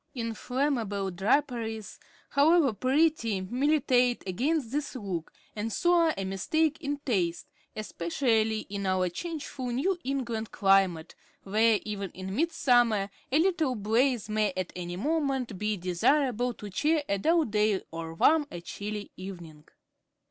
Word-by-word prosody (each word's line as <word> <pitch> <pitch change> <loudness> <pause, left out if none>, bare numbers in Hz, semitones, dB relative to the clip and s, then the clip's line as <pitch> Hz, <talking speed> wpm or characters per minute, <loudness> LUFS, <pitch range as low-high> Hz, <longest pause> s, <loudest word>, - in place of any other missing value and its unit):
Inflammable 230 -4 -1
draperies, 225 +1 -1 0.3
however 295 -2 +4
pretty, 255 - +1
militate 250 +2 +2
against 255 - 0
this 290 0 -3
look, 190 -9 -4 0.2
and 220 +2 -3
so 345 - +2
are 335 -2 +4
a 195 - -2
mistake 305 - 0
in 290 -1 -2
taste, 180 -9 0 0.3
especially 215 +2 0
in 200 0 -5
our 185 -1 +1
changeful 285 - -5
New 290 +10 0
England 240 -5 -3
climate, 195 -5 +2 0.3
where, 215 +2 +3
even 200 -2 -4
in 190 +1 -5
midsummer, 240 -9 +2 0.2
a 275 - +4
little 320 -6 +2
blaze 225 +2 +1
may 215 -1 +1
at 185 -2 -3
any 175 -1 -5
moment 270 - -1
be 210 0 -1
desirable 245 - +1
to 205 -1 -9
cheer 305 - +1
a 200 0 0
dull 325 - +3
day 210 -2 +1
or 165 0 -6
warm 300 - +4
a 175 - -7
chilly 205 +4 -6
evening. 170 -5 -9
225 Hz, 135 wpm, -28 LUFS, 195-280 Hz, 0.3 s, however